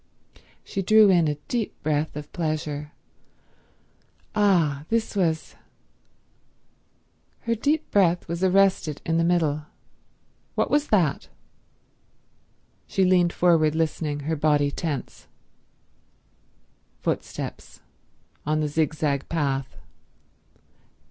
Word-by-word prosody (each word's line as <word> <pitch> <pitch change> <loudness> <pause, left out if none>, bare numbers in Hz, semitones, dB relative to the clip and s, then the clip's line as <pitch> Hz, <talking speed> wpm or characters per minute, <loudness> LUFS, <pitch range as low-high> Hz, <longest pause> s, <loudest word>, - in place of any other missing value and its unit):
She 195 - -4
drew 215 +1 +6
in 170 -3 +4
a 150 - 0
deep 235 -4 -3
breath 150 0 -1
of 150 0 -8
pleasure. 150 -3 -3 1.4
Ah, 170 -9 +2
this 225 -1 -1
was— 165 -5 0 1.9
Her 230 - 0
deep 295 +7 -1
breath 180 -4 +2
was 170 +2 -3
arrested 190 -5 +2
in 165 -1 +1
the - - +2
middle. 155 -3 +1 0.9
What - - 0
was 295 0 +2
that? 175 -9 +1 1.6
She 190 - +1
leaned 180 -2 +4
forward 165 -4 +3
listening, 155 -2 -1
her 160 +3 -2
body 145 -1 +2
tense. 150 -2 -5 1.7
Footsteps. - - -5 0.6
On 155 +1 0
the 155 - 0
zigzag 150 -2 -1
path. 140 -5 -2
160 Hz, 95 wpm, -25 LUFS, 150-185 Hz, 1.9 s, drew